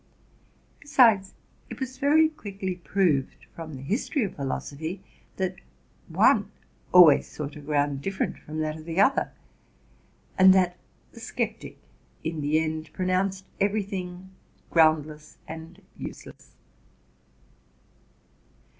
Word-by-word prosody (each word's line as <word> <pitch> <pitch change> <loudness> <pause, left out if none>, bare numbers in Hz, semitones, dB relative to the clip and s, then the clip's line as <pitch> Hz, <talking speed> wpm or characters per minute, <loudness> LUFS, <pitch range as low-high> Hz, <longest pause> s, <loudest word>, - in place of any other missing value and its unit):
Besides, 230 -9 +4 0.3
it - - -8
was 260 -1 -5
very 305 +3 +5
quickly 200 -10 -5
proved, 170 -5 0
from 160 -3 -8
the 130 - -9
history 235 - -1
of 195 - -4
philosophy, 150 +6 -4 0.3
that 185 -1 -2 0.5
one - - +3 0.4
always 170 -6 +7
sought 150 0 -7
a - - -9
ground 145 -1 0
different 195 +5 -3
from 155 +1 -8
that 155 0 -2
of 155 - -12
the 165 +2 -2
other, 265 +7 +3 1.1
and 190 0 +8
that 180 -1 +2 0.3
the - - -13
sceptic, - - -4 0.5
in 160 -1 -3
the 150 +2 +2
end, 155 0 -3
pronounced 185 +1 -1
every 205 +1 +1
thing 185 -1 -7 0.4
groundless 155 -2 +2
and 165 +4 -10
useless. - - -10
180 Hz, 115 wpm, -26 LUFS, 155-195 Hz, 1.1 s, and